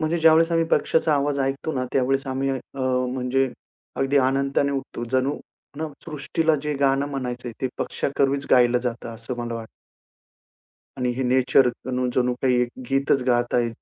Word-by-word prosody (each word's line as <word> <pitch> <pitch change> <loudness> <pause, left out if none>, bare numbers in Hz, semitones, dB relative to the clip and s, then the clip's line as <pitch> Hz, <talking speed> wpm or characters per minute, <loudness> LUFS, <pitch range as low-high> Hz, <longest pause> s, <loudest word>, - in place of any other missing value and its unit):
म्हणजे 160 +2 0
ज्यावेळेस 165 +1 +5
आम्ही 165 0 +3
पक्षाचा 160 -1 +1
आवाज 140 0 0
ऐकतो 135 +3 -1
ना 130 -3 -1
त्यावेळेस 135 +1 +1
आम्ही 135 +1 -1
अ, 135 - -1 0.6
म्हणजे 130 +1 +1 0.5
अगदी 135 +1 +1
आनंदाने 140 +1 +1
उठतो. 135 -3 -4
जणू 130 +2 +1 0.4
ना 160 0 -3 0.2
सृष्टीला 160 +1 0
जे 150 0 -2
गाणं 135 0 +2
म्हणायचंय 125 -3 -4
ते 130 - 0
पक्षाकर्वीच 140 0 -1
गायलं 125 -1 +5
जातं. 120 -1 -4
असं 115 +2 -6
मला 120 -1 -3
वाटतं. 115 -1 -7 1.3
आणि 125 -2 0
हे 130 - -1
नेचर 130 +1 +4 0.5
जणू 125 -1 +2
काही 125 -2 +3
एक 120 - -1 0.2
गीतच 135 0 +2
गात 120 -1 +1
आहे. 120 -1 +2
135 Hz, 155 wpm, -24 LUFS, 125-140 Hz, 1.3 s, ज्यावेळेस